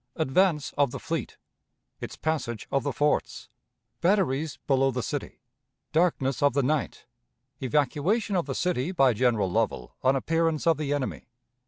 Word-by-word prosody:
Advance 160 Hz, +1 st, +1 dB
of 140 Hz, -2 st, +4 dB
the -, -, -6 dB
Fleet. -, -, -4 dB, 0.6 s
Its -, -, -6 dB
Passage 145 Hz, -8 st, -2 dB
of 135 Hz, -, +2 dB
the 145 Hz, -, -2 dB
Forts. 150 Hz, +2 st, -1 dB, 0.5 s
Batteries 160 Hz, -5 st, +1 dB
below 135 Hz, -1 st, +3 dB
the 125 Hz, -2 st, -2 dB
City. 145 Hz, -2 st, -5 dB, 0.5 s
Darkness 155 Hz, -5 st, +1 dB
of 145 Hz, -3 st, +4 dB
the 140 Hz, 0 st, +2 dB
Night. 145 Hz, 0 st, -1 dB, 0.6 s
Evacuation 150 Hz, -, +1 dB
of 175 Hz, -5 st, 0 dB
the 135 Hz, -, -3 dB
City 175 Hz, -3 st, 0 dB
by 135 Hz, -9 st, +4 dB
General 110 Hz, -5 st, +1 dB
Lovell 60 Hz, -7 st, -1 dB
on 130 Hz, +1 st, +3 dB
Appearance 165 Hz, +3 st, 0 dB
of 165 Hz, -3 st, +4 dB
the 150 Hz, -2 st, -3 dB
Enemy. 145 Hz, -4 st, -3 dB
145 Hz, 150 wpm, -27 LUFS, 130-165 Hz, 0.6 s, of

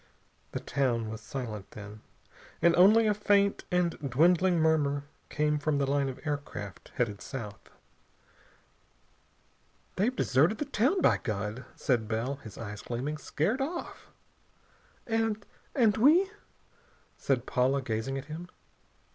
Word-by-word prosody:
The -, -, -2 dB
town 120 Hz, -5 st, -1 dB
was 110 Hz, -, -7 dB
silent, 110 Hz, -7 st, -6 dB
then, 105 Hz, 0 st, -10 dB, 0.6 s
and 170 Hz, 0 st, +4 dB
only 210 Hz, +6 st, +6 dB
a 210 Hz, -, +3 dB
faint 200 Hz, -1 st, +2 dB
and 180 Hz, -1 st, +2 dB, 0.2 s
dwindling 175 Hz, +6 st, +4 dB
murmur 150 Hz, -3 st, +2 dB, 0.3 s
came 150 Hz, 0 st, +1 dB
from 145 Hz, 0 st, 0 dB
the 140 Hz, -, +1 dB
line 140 Hz, 0 st, +1 dB
of 130 Hz, -, -7 dB
aircraft 140 Hz, -10 st, -5 dB
headed 105 Hz, -5 st, -1 dB
south. 110 Hz, -7 st, -7 dB, 2.3 s
"They've 235 Hz, +7 st, +1 dB
deserted 155 Hz, -, +3 dB
the 295 Hz, -, -2 dB
town, 280 Hz, -, +1 dB
by -, -, +4 dB
God!" 105 Hz, +2 st, -4 dB
said 120 Hz, -5 st, 0 dB
Bell, 115 Hz, +5 st, -2 dB
his 110 Hz, -6 st, -11 dB
eyes 105 Hz, -2 st, -6 dB
gleaming. 135 Hz, +6 st, -4 dB
"Scared 195 Hz, -, -1 dB
off!" 340 Hz, +6 st, -5 dB, 1.0 s
"And 225 Hz, -2 st, -1 dB, 0.3 s
and 230 Hz, -6 st, +4 dB
we 330 Hz, -, +5 dB, 0.4 s
" -, -, -34 dB
said -, -, 0 dB
Paula, 130 Hz, +2 st, +1 dB
gazing 115 Hz, +3 st, -2 dB
at 135 Hz, -, -6 dB
him. 160 Hz, +4 st, -7 dB
145 Hz, 130 wpm, -29 LUFS, 120-200 Hz, 2.3 s, only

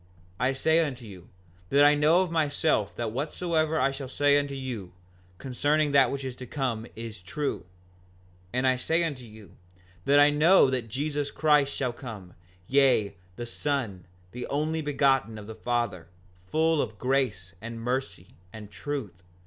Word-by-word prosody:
5:48 125 Hz, -, +1 dB
I 135 Hz, -, +1 dB
say 160 Hz, +5 st, +2 dB
unto 130 Hz, -6 st, -5 dB
you, 95 Hz, -4 st, -12 dB, 0.4 s
that 140 Hz, +1 st, +5 dB
I 145 Hz, -, +7 dB
know 155 Hz, +4 st, +4 dB
of 180 Hz, -, -5 dB
myself 150 Hz, -, +1 dB
that 115 Hz, -2 st, -3 dB
whatsoever 155 Hz, +4 st, -1 dB
I 135 Hz, +1 st, +2 dB
shall 135 Hz, 0 st, -6 dB
say 145 Hz, +1 st, +3 dB
unto 140 Hz, -1 st, -4 dB
you, 120 Hz, -9 st, -6 dB, 0.4 s
concerning 145 Hz, +5 st, 0 dB
that 135 Hz, -3 st, +5 dB
which 135 Hz, 0 st, -4 dB
is 130 Hz, -2 st, -5 dB
to 125 Hz, -, -8 dB
come, 120 Hz, -5 st, -3 dB
is 110 Hz, -3 st, -8 dB
true; 120 Hz, -, -4 dB, 0.8 s
and 125 Hz, +1 st, 0 dB
I 130 Hz, -1 st, +3 dB
say 165 Hz, +6 st, +1 dB
unto 140 Hz, -7 st, -4 dB
you, 105 Hz, -4 st, -15 dB, 0.5 s
that 145 Hz, +1 st, +5 dB
I 145 Hz, 0 st, +6 dB
know 150 Hz, -1 st, +5 dB
that 120 Hz, -3 st, -2 dB
Jesus 145 Hz, +4 st, -2 dB
Christ 150 Hz, -3 st, +3 dB
shall 125 Hz, -3 st, -1 dB
come, 110 Hz, -8 st, -9 dB, 0.3 s
yea, 130 Hz, -7 st, +3 dB, 0.2 s
the 120 Hz, -, -5 dB
Son, 120 Hz, -7 st, -3 dB, 0.3 s
the 125 Hz, 0 st, -6 dB
Only 155 Hz, +3 st, -1 dB
Begotten 135 Hz, -6 st, +1 dB
of 105 Hz, -, -9 dB
the 110 Hz, -, -8 dB
Father, 110 Hz, -7 st, -2 dB, 0.4 s
full 160 Hz, -, +2 dB
of 105 Hz, -, -5 dB
grace, 125 Hz, -10 st, -1 dB
and 115 Hz, 0 st, -7 dB
mercy, 130 Hz, +3 st, -4 dB, 0.2 s
and 105 Hz, -2 st, -10 dB
truth. 120 Hz, -, -5 dB
135 Hz, 165 wpm, -27 LUFS, 115-145 Hz, 0.8 s, I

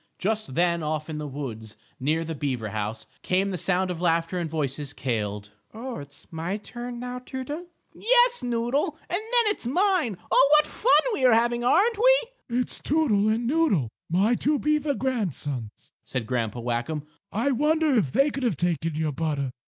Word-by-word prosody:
Just 210 Hz, -8 st, -2 dB
then, 170 Hz, -1 st, +2 dB
off 155 Hz, 0 st, -3 dB
in 150 Hz, -, -4 dB
the 150 Hz, -, -4 dB
woods, 120 Hz, -6 st, -7 dB, 0.2 s
near 155 Hz, +5 st, +1 dB
the 165 Hz, -, -4 dB
beaver 130 Hz, -7 st, -2 dB
house, 110 Hz, +1 st, -4 dB, 0.2 s
came 190 Hz, +2 st, +1 dB
the -, -, -2 dB
sound 185 Hz, +2 st, +1 dB
of 175 Hz, -1 st, -5 dB
laughter 170 Hz, +1 st, +1 dB
and 170 Hz, -2 st, -2 dB
voices 145 Hz, -2 st, -3 dB
cailed: 105 Hz, -4 st, -3 dB, 0.2 s
"Oh, 245 Hz, +2 st, -5 dB
it's 140 Hz, 0 st, -11 dB
my 170 Hz, +5 st, -3 dB
turn 240 Hz, +3 st, -7 dB
now, 250 Hz, +1 st, -5 dB
Toodle." 270 Hz, +7 st, -6 dB, 0.3 s
"Yes, 485 Hz, +1 st, +3 dB
Noodle, 245 Hz, +6 st, 0 dB
and 355 Hz, -, -2 dB
then 465 Hz, +2 st, +2 dB
it's 240 Hz, -, -7 dB
mine. 350 Hz, -, +2 dB
Oh, 275 Hz, -, +6 dB
what 300 Hz, 0 st, +6 dB
fun -, -, +3 dB
we 270 Hz, -, -2 dB
are 250 Hz, -2 st, +6 dB
having, 240 Hz, +1 st, +2 dB
aren't 410 Hz, -, +3 dB
we?" -, -, +5 dB, 0.3 s
"It's 250 Hz, -, -1 dB
Toodle 240 Hz, -9 st, +2 dB
and 225 Hz, +2 st, 0 dB
Noodle 250 Hz, -, +2 dB, 0.2 s
my 195 Hz, +8 st, +3 dB
two 295 Hz, +5 st, +1 dB
beaver 300 Hz, -1 st, +1 dB
grandsons," 155 Hz, -, -3 dB
said 125 Hz, -3 st, -3 dB
Grandpa 120 Hz, -1 st, -2 dB
Whackum. 120 Hz, +6 st, -2 dB, 0.3 s
"I 235 Hz, +7 st, +1 dB
wonder 305 Hz, +3 st, +2 dB
if 180 Hz, -, +2 dB
they 275 Hz, -, +3 dB
could 275 Hz, -, -4 dB
have 230 Hz, -, 0 dB
taken 165 Hz, -2 st, -1 dB
your 155 Hz, -1 st, 0 dB
butter? 145 Hz, -3 st, -2 dB
195 Hz, 175 wpm, -26 LUFS, -, 0.3 s, Oh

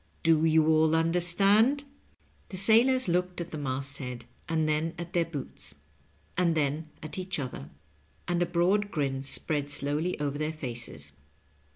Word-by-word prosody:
Do 160 Hz, -1 st, +4 dB
you 160 Hz, -1 st, +4 dB
all 160 Hz, 0 st, +4 dB
understand 180 Hz, -, +3 dB
t 285 Hz, -, -11 dB, 0.3 s
" -, -, -36 dB
The 190 Hz, -, -5 dB
sailors 235 Hz, +5 st, +5 dB
looked 180 Hz, +1 st, 0 dB
at 170 Hz, -, -5 dB
the 155 Hz, -, -4 dB
masthead, 130 Hz, -3 st, -4 dB, 0.2 s
and 160 Hz, -1 st, +1 dB
then 155 Hz, +2 st, 0 dB
at 170 Hz, 0 st, -7 dB
their 170 Hz, -1 st, +2 dB
boots, 145 Hz, -, -7 dB, 0.6 s
and 170 Hz, -2 st, +2 dB
then 155 Hz, +1 st, -1 dB
at 155 Hz, +4 st, -4 dB
each 185 Hz, 0 st, -3 dB
other, 130 Hz, -, -5 dB, 0.6 s
and 175 Hz, -1 st, 0 dB
a 175 Hz, -, +2 dB
broad 185 Hz, +4 st, +2 dB
grin 135 Hz, -6 st, -1 dB
spread 145 Hz, +1 st, -2 dB
slowly 145 Hz, +5 st, -1 dB
over 145 Hz, -1 st, -2 dB
their 155 Hz, +1 st, -1 dB
faces. 115 Hz, -, -5 dB
160 Hz, 160 wpm, -29 LUFS, 145-180 Hz, 0.6 s, sailors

